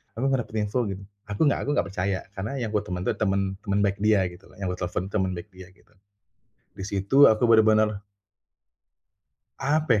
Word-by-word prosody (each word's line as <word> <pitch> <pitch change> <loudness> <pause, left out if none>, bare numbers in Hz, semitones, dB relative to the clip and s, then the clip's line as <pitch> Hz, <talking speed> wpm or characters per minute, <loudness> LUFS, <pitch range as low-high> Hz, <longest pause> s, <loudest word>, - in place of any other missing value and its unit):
"Aku 120 +4 -2
nggak 135 -2 +1
dapet 110 - -12
info," 115 +3 -1
gitu. 95 0 -5 0.3
Aku 105 +5 -4
nggak - - 0
aku - - -3
nggak - - +1
percaya, 95 0 -1 0.2
karena 100 +7 -3
yang 110 - -2
gua 105 - +2
teman 90 -2 -4
tuh - - +1
teman 100 -2 +1 0.2
teman 100 0 +1
baik 100 0 0
dia 105 -2 +4
gitulah, 90 - -16
yang 95 - -2
gue 90 - -5
telfon 90 +1 -3
tuh, - - -21
teman 95 - -1
baik 85 +4 -9
dia, 95 0 -12
gitu. 100 - -28 0.9
Di 95 - -5
situ 100 +6 -1
aku 110 +1 +2
benar-benar 110 -2 +4 1.6
apa 140 -5 +2
100 Hz, 200 wpm, -25 LUFS, 95-110 Hz, 1.6 s, dia